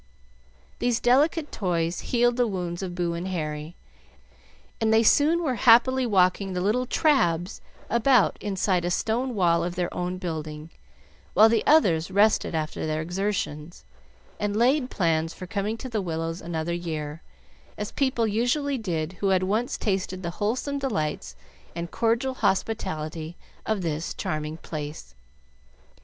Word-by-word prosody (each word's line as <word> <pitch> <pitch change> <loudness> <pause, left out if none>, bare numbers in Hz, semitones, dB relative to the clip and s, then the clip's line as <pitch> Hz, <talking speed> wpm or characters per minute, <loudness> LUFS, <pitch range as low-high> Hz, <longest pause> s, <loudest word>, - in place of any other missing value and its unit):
These 245 -1 +1
delicate 295 +5 +2
toys 170 -3 -1
healed 240 0 +1
the 245 -1 +2
wounds 180 -3 -3
of 180 -2 -5
Boo 175 -1 -1
and 170 +2 -4
Harry, 155 -2 -4 1.1
and 220 0 +2
they 220 0 +5
were - - +1
soon 300 +3 +3
happily 250 +3 +5
walking 190 -1 +2
the 180 - -1
little 235 +6 +1
"trabs" 185 - +1 0.3
about 235 -1 +3
inside 190 -3 0
a 175 - 0
stone 235 +7 -1
wall 170 -4 +3
of 175 0 -3
their 180 -1 -2
own 180 +1 -3
building, 155 -3 -5 0.6
while 215 +3 +7
the 225 -1 +2
others 185 - +4
rested 200 -2 +3
after 155 0 -3
their 155 0 -1
exertions, 175 - -3 0.5
and 205 -1 -1
laid 255 +3 +3
plans 165 -5 0
for 185 - -8
coming 200 +4 -2
to 260 - -7
the 225 -4 -2
Willows 165 -1 -3
another 165 0 -3
year, 160 -3 -4 0.6
as 210 - -4
people 260 -4 +1
usually 245 +6 0
did 170 -5 -3
who 200 - 0
had 190 -1 +3
once 215 +6 0
tasted 190 -3 -2
the 170 - -3
wholesome 255 +7 -1
delights 155 - -2 0.4
and 170 0 -5
cordial 235 +3 +1
hospitality 185 -7 -2 0.3
of 215 -4 0
this 160 0 -3
charming 155 0 -3
place. 150 - -7
190 Hz, 145 wpm, -25 LUFS, 165-230 Hz, 1.1 s, while